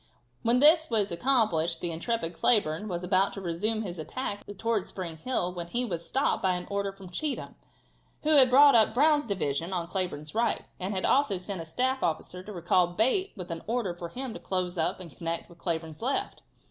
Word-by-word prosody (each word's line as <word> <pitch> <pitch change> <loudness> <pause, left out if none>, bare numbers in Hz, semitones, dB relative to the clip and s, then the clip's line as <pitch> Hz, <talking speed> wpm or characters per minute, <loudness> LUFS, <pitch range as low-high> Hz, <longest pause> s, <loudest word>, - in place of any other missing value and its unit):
When 235 +2 +3
this 315 +2 +6
was 210 -4 +1
accomplished 170 -6 +1
the 175 - -2
intrepid 170 +1 -2
Cleburne 200 -2 +2
was 175 -2 -4
about 190 +2 +2
to - - -6
resume 210 +6 -1
his 175 -4 -6
attack 205 +5 -4
towards 225 -3 -1
Spring 170 -4 -6
Hill 180 -2 -1
when 170 -1 -5
he 245 +7 -1
was 170 -7 -4
stopped 270 +3 +1
by 185 -2 +2
an 180 - -5
order 200 0 -1
from 195 -2 -13
Cheatham, 295 +7 -3 0.7
who 305 - +2
had 270 -4 +7
brought 280 +3 +7
up 220 -1 +4
Brown's 295 0 +4
division 170 -3 -1
on 175 -2 -1
Cleburne's 170 -4 -3
right, 230 0 0
and 185 +2 -2
had 185 - 0
also 260 -8 +3
sent 185 0 -5
a - - -7
staff 255 +10 -1
officer 170 +3 -2
to 210 - -10
recall 175 -1 +2
Bate 255 - +1
with 180 -2 -6
an 165 -1 -4
order 225 -6 -1
for 175 -1 -7
him 255 +5 -5
to - - -7
close 185 -1 -2
up 175 +3 -1
and 170 -5 -10
connect 165 0 -4
with 170 0 -17
Cleburne's 160 -3 -4
left. 265 +4 -1
190 Hz, 205 wpm, -28 LUFS, 170-235 Hz, 0.7 s, had